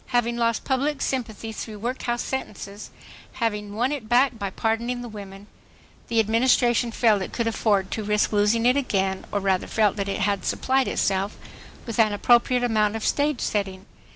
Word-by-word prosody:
Having 240 -1 0
lost 230 -1 +1
public 275 +2 0
sympathy 225 -5 -3
through 215 0 -7
workhouse 240 +1 -2
sentences, 210 -5 -6 0.4
having 210 -3 -2
won 245 +5 +1
it 260 -7 -5
back 245 -1 +3
by 200 -1 -2
pardoning 230 +4 -2
the - - -6
women, 200 -2 -10 0.6
the 230 - +1
Administration 240 +2 +3
felt 220 -3 +3
it - - -5
could 235 - -1
afford 205 -4 +1
to 220 - -3
risk 210 +1 +1
losing 210 +3 +2
it 250 +1 +5
again, 195 -8 0
or 205 - 0
rather 190 -2 0
felt 215 -2 +1
that 200 -1 -2
it 200 - -2
had 200 -1 0
supplied 265 -2 +1
itself 195 0 0 0.5
with 230 -1 -5
an 215 -2 +4
appropriate 240 +3 +3
amount 215 -3 +2
of 220 - -3
stage 290 -2 +1
setting. 195 -2 -2
225 Hz, 175 wpm, -24 LUFS, 205-240 Hz, 0.6 s, it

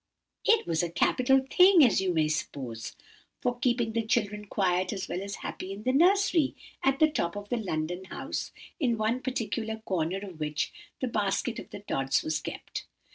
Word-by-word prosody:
"It 450 0 +4
was 165 -1 +1
a 175 - -1
capital 260 +9 +3
thing, 360 -4 +8
as 220 - +3
you 190 -1 +1
may 160 -3 +2
suppose, 130 -7 -4 0.4
for 245 -1 -1
keeping 240 -3 +1
the 230 - +1
children 210 -2 0
quiet 185 -2 +1
as 190 -3 -4
well 180 - -3
as 200 0 -5
happy 185 - -5
in 200 +2 -7
the 255 - +1
nursery, 345 -1 +4 0.3
at 270 0 +2
the 310 - +6
top 170 - -2
of 205 0 -7
the 245 - 0
London 180 -3 -3
house, - - -4 0.3
in 245 -7 +1
one 220 +4 0
particular 225 -3 -2
corner 180 0 0
of 195 -5 -8
which 150 0 -2 0.3
the 260 - +1
basket 215 +1 -1
of - - -10 0.2
Tods 135 -7 +1
was 155 0 -1
kept. - - -6
210 Hz, 185 wpm, -29 LUFS, 175-250 Hz, 0.4 s, thing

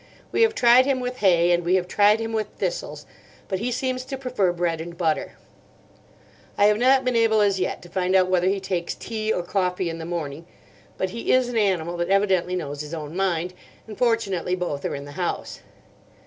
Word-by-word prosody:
We - - +1
have 450 -1 +4
tried 245 -1 +6
him 270 -2 +1
with 250 0 -4
hay, 175 -4 +4
and 175 0 +2
we 175 +2 +2
have 180 -1 0
tried 210 +3 +4
him 225 0 -4
with 215 -2 -1
thistles; - - -4 0.4
but 190 - -2
he 240 +4 -2
seems 255 +1 -2
to 270 0 -5
prefer 250 -8 0
bread 170 -2 -1
and 170 +1 -8
butter. 160 -3 -1 1.2
I 205 - +5
have 210 0 +4
not 260 +1 +4
been 250 -1 +1
able 225 -1 +3
as 200 -2 +2
yet 185 - -2
to - - -11
find 185 +1 0
out 185 -1 +5
whether 185 -1 +2
he 195 +1 +1
takes 180 -3 -3
tea 220 -1 -3
or 180 - -1
coffee 180 -1 -1
in 165 - -7
the 160 - -6
morning. 165 -2 -5 0.5
But 190 -1 -2
he 230 - -2
is 255 -1 +3
an 245 - -5
animal 175 -4 0
that 175 +1 -2
evidently 190 -2 +2
knows 145 -5 -4
his 150 +2 -6
own 155 0 -7
mind, 180 -2 -1 0.3
and 215 - -9
fortunately 200 -7 0
both 175 -6 -4
are - - -2
in 140 0 -7
the 145 - -10
house. 175 - -3
190 Hz, 215 wpm, -24 LUFS, 175-225 Hz, 1.2 s, tried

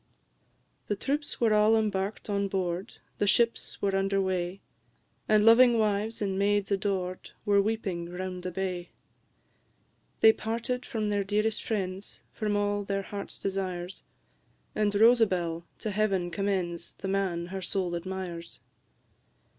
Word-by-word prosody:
The 205 - 0
troops 285 +7 -2
were 225 -3 +3
all 215 +1 +5
embark'd 210 -2 -1
on 200 -1 0
board, 185 +1 -2 0.2
The 205 - +2
ships 230 +3 +1
were 195 -1 +2
under 195 0 +1
weigh, 185 0 -1 0.7
And 215 0 +5
loving 235 +1 +7
wives, 215 0 0
and 195 -1 -1
maids 205 0 +2
adored, 190 -2 -1 0.2
Were 200 -1 +5
weeping 195 -5 -2
round 180 0 -5
the 180 - -3
bay. 180 -1 -3 1.3
They 220 - +8
parted 235 +4 -3
from 215 -2 -1
their 205 -1 +1
dearest 210 +2 0
friends, 195 -2 -4
From 210 -1 -1
all 205 0 0
their 195 0 -2
heart 200 +1 -7
desires; 185 -2 -3 0.7
And 210 -1 +1
Rosabel 190 -7 +4
to 215 - -3
Heaven 195 -4 0
commends 180 -3 -2
The 195 - -6
man 190 -3 0
her 190 - -3
soul 180 -1 -1
admires! 175 -1 -5
195 Hz, 135 wpm, -29 LUFS, 185-215 Hz, 1.3 s, They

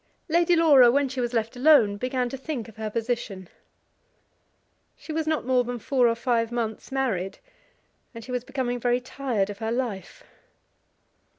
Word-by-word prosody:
Lady 345 +1 +3
Laura 290 -7 +6
when 280 +3 +2
she 260 -1 -4
was 240 -1 -1
left 230 0 -2
alone 250 -6 +5
began 255 +3 -2
to 245 - -6
think 270 -4 -5
of 225 - -15
her 220 -1 -3
position. 225 -4 -3 1.5
She 315 - -8
was 320 0 -2
not 315 -5 0
more 255 -1 +2
than 245 0 -4
four 250 +1 +2
or 230 - +1
five 230 -1 0
months 230 0 -4
married, 220 -9 -2 0.8
and 230 - -8
she 250 - -9
was 250 -1 -2
becoming 255 -2 -3
very 245 +1 +1
tired 245 -6 -2
of 200 - -10
her 225 0 -2
life. 235 - -4
245 Hz, 170 wpm, -25 LUFS, 225-270 Hz, 1.5 s, Laura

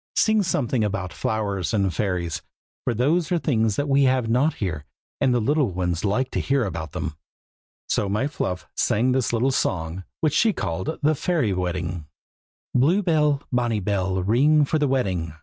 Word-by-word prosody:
sing 220 -1 +3
something 130 - 0
about 100 -3 -2
flowers 100 -5 -1
and 95 -3 +1
fairies, 90 -5 -2 0.4
for - - 0
those 155 +8 +1
are 175 - +3
things 115 -10 +1
that 145 - -1
we 140 0 +4
have 130 -2 +2
not 130 +7 +2
here, 80 -8 -3 0.4
and 135 - +3
the 125 - +2
little 140 +2 +2
ones 90 -1 -2
like 125 +6 0
to - - -1
hear 135 -3 +1
about 80 -5 -5
them." 75 - -4 0.7
So 100 - 0
my 105 +7 0
Fluff 90 - -3
sang 120 +5 +2
this 130 -2 +1
little 120 +3 +1
song, 85 -6 -1 0.2
which 155 -2 +1
she 220 +7 +3
called 95 - -3
"The 155 +2 +4
Fairy 150 - 0
Wedding:" 90 -3 -3 0.7
Blue 165 +11 +3
bell, 150 -5 +2
bonny 120 -3 +1
bell, 95 -1 -1
ring 145 +9 +4
for 155 +3 0
the 145 - +2
wedding! 95 - -1
115 Hz, 175 wpm, -24 LUFS, 95-140 Hz, 0.7 s, we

